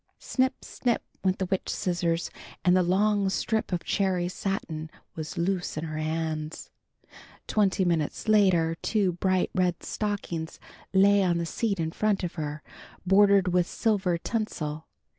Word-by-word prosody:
Snip! 260 0 -1
Snip! 240 -2 -1 0.2
went 185 -1 +2
the 190 - -1
witch 185 +1 -2
scissors, 175 -2 -1 0.3
and 180 0 +5
the 185 - +5
long 200 +2 +2
strip 220 +3 -1
of 175 -2 -1
cherry 185 -3 0
satin 170 -4 -3 0.2
was 155 -1 -6
loose 180 -1 -1
in 155 - -2
her 155 -1 -4
hands. 155 0 -3 0.7
Twenty 195 -3 +2
minutes 165 +2 -1
later 185 -6 +4
two 205 -5 +1
bright 185 +1 0
red 180 -2 0
stockings 195 -6 -3 0.3
lay 200 +1 +5
on 175 -3 +2
the 170 - -1
seat 200 +3 -1
in 160 -1 -1
front 210 +1 0
of 175 - -3
her, 150 -1 -5 0.4
bordered 195 0 +5
with 180 0 +2
silver 195 -6 +1
tinsel. 160 -7 -3
185 Hz, 145 wpm, -27 LUFS, 165-200 Hz, 0.7 s, and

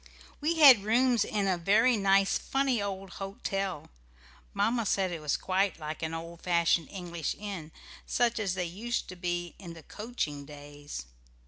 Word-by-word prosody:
We 315 +3 0
had 270 -9 +9
rooms 240 +1 +3
in 205 -2 -1
a 185 -2 +1
very 220 +8 +4
nice 195 -1 +3
funny 270 -4 0
old 195 -1 -5
hotel. 195 - -4 0.6
Mamma 230 - +1
said 190 -2 +1
it 165 -2 -5
was 150 -2 0
quite 190 +1 0
like 155 0 -6
an 160 0 -3
old 165 +1 -8
fashioned 170 -2 +2
English 175 -4 -4
inn, 195 -7 -6 0.4
such 240 -2 +1
as 195 -4 -1
they 180 -1 -1
used 215 +8 -3
to 185 - -7
be 175 -1 -3
in 175 -4 -8
the 165 - -12
coaching 185 - -4
days. 145 - -9
190 Hz, 160 wpm, -29 LUFS, 170-215 Hz, 0.6 s, had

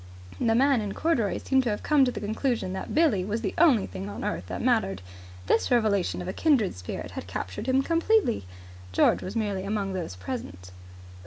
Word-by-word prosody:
The 225 -2 +2
man 270 -1 +4
in 205 -2 -4
corduroys 245 - 0
seemed 265 -1 +3
to - - +1
have 210 - -3
come 295 -3 +4
to 250 - 0
the - - -5
conclusion 220 -1 -1
that 190 - -5
Billie 300 - +3
was 210 +4 -2
the 200 - -2
only 295 -10 +5
thing 95 +2 -7
on 100 +2 -6
earth 90 - -3
that 90 -1 -5
mattered. 95 -1 +1 0.4
This 225 - +2
revelation 210 -7 +1
of - - -8
a 185 - -3
kindred 270 - +2
spirit 90 -1 -6
had - - -7
captured 95 - -5
him 265 +1 +3
completely. 335 - +1 0.4
George 90 - +3
was 185 - -6
merely 205 -4 -1
among 200 -1 -2
those 175 - -4
present. 90 -2 -7
205 Hz, 195 wpm, -27 LUFS, -, 0.4 s, only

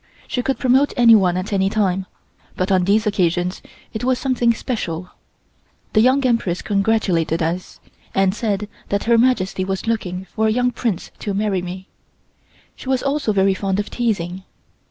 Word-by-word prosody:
She 250 - -1
could 270 +2 -1
promote 265 +2 +3
anyone 215 -7 +5
at 185 +3 -3
any 195 0 +2
time, 190 -3 0 0.5
but 185 +2 -1
on 185 -2 +3
these 210 +3 +2
occasions 180 -2 0 0.3
it 220 - -4
was 255 0 +2
something 250 -3 +1
special. 185 -8 -4 0.8
The 215 - +5
Young 260 +3 +3
Empress 230 -8 0
congratulated 195 -5 +1
us, 170 +3 -3 0.4
and 195 -1 +3
said 210 -2 -2 0.2
that 200 0 0
Her 230 0 +4
Majesty 215 -7 +1
was 190 +2 -3
looking 190 -5 -2
for 220 +3 -1
a - - +2
young 245 +2 +1
Prince 220 -7 -3
to 200 -2 -3
marry 200 -2 0
me. 185 +2 -7 0.9
She 260 - -9
was 260 -1 +1
also 275 -4 0
very 195 -1 +3
fond 195 0 -1
of 210 - -4
teasing. 190 -6 -2
200 Hz, 165 wpm, -20 LUFS, 185-235 Hz, 0.9 s, anyone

